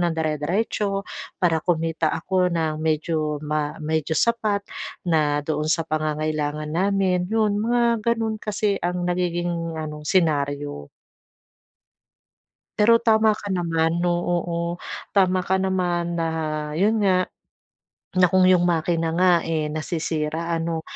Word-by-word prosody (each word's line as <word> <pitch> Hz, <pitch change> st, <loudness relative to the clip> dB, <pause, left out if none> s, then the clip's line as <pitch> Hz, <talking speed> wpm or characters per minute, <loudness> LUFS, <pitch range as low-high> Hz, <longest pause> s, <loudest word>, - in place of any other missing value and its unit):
ng 175 Hz, -1 st, +1 dB
dire-diretso 190 Hz, +6 st, -1 dB, 0.4 s
para 165 Hz, -3 st, +3 dB
kumita 165 Hz, -1 st, 0 dB
ako 185 Hz, -1 st, +1 dB
ng 160 Hz, -2 st, 0 dB
medyo 155 Hz, -1 st, 0 dB
ma 150 Hz, 0 st, -1 dB
medyo 160 Hz, 0 st, -1 dB
sapat 215 Hz, -4 st, +1 dB, 0.4 s
na 150 Hz, -3 st, +2 dB
doon 155 Hz, 0 st, -1 dB
sa 165 Hz, +1 st, +2 dB
pangangailangan 155 Hz, -1 st, -2 dB
namin, 185 Hz, 0 st, +1 dB
'yon 215 Hz, -1 st, +1 dB
mga 235 Hz, 0 st, +2 dB
ganoon 225 Hz, -2 st, 0 dB
kasi 210 Hz, -1 st, 0 dB
ang 180 Hz, 0 st, -2 dB
nagiging 175 Hz, -2 st, -1 dB
ano, 155 Hz, -1 st, -5 dB
senaryo. 145 Hz, -, 0 dB, 1.9 s
Pero 230 Hz, +2 st, +5 dB
tama 220 Hz, -1 st, +4 dB
ka 205 Hz, -1 st, -6 dB
naman, 170 Hz, -2 st, 0 dB
oo, 175 Hz, 0 st, +1 dB
oo. 170 Hz, -1 st, -3 dB, 0.6 s
Tama 185 Hz, -1 st, +4 dB
ka 190 Hz, -, +2 dB
naman 175 Hz, -3 st, -1 dB
na 165 Hz, -, 0 dB, 0.5 s
yun 215 Hz, +5 st, +2 dB
nga, 185 Hz, -2 st, +3 dB, 0.9 s
na 185 Hz, -, +6 dB
kung 185 Hz, -1 st, +5 dB
'yong 180 Hz, -1 st, +5 dB
makina 165 Hz, -1 st, 0 dB
nga, 180 Hz, +1 st, +4 dB
eh, 160 Hz, -2 st, -1 dB
nasisira 160 Hz, 0 st, -2 dB
ano 165 Hz, 0 st, -2 dB
170 Hz, 125 wpm, -23 LUFS, 155-190 Hz, 1.9 s, na